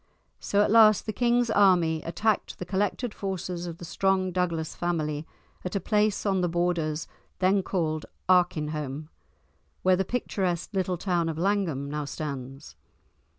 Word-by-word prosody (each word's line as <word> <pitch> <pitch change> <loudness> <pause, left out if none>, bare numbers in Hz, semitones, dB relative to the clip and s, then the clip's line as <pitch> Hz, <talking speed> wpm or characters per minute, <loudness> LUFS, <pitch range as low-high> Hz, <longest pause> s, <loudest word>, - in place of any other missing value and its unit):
So 205 0 +2
at - - 0
last 215 -2 +6
the 215 - -3
king's 240 0 +2
army 175 -6 +4
attacked 210 +7 -1
the 180 - -5
collected 205 +5 -1
forces 180 -2 -4
of 170 -1 -6
the 175 - -9
strong 190 +1 +1
Douglas 170 -3 -1
family 155 -3 -2 0.4
at 180 - -4
a - - +2
place 210 +2 +1
on 190 -2 +2
the 175 - +1
Borders 165 -2 -1 0.3
then 195 +1 +3
called 160 -5 -2 0.2
Arkinholm, 155 -5 +1 0.7
where 185 0 +5
the 190 - +1
picturesque 190 -6 -2
little 185 -2 0
town 175 -2 0
of 160 - -4
Langholm 175 -7 0
now 150 +1 -3
stands. 140 -2 -6
180 Hz, 150 wpm, -27 LUFS, 160-195 Hz, 0.7 s, last